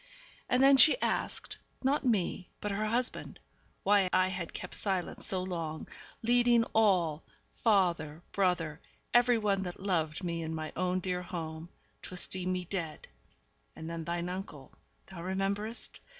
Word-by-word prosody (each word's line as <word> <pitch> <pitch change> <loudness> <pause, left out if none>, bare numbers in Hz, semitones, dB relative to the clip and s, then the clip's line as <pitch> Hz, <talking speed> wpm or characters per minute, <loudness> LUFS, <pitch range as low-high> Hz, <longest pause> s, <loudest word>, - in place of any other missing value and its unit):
And 250 +1 +3
then 275 0 +7
she 315 - +7
asked - - -2 0.2
not 280 +3 +2
me, 195 -6 0
but 210 - -3
her 210 +2 -1
husband 240 +3 0 0.5
why 200 -2 +4
I 185 0 +3
had 180 -3 -4
kept - - -7
silent 190 -3 -2
so 185 -1 +5
long, 165 -4 -4 0.4
leading 240 0 +4
all 180 -8 +3 0.4
father, 175 -7 +2
brother, 180 -5 0 0.3
every 245 0 +5
one 205 -3 +1
that 180 -2 -6
loved 170 -5 -1
me 170 -1 -2
in 160 0 -4
my 155 -1 -5
own 185 +1 0
dear 180 -1 -2
home 165 -2 -6 0.3
to 185 - -9
esteem 185 0 0
me 180 -1 -2
dead. 165 -4 -5 0.7
And 160 - -8
then 165 0 -4
thine 170 +1 -2
uncle 180 -7 -7 0.3
(thou 180 -3 -10
rememberest?) 195 +5 -1
185 Hz, 150 wpm, -31 LUFS, 170-205 Hz, 0.7 s, then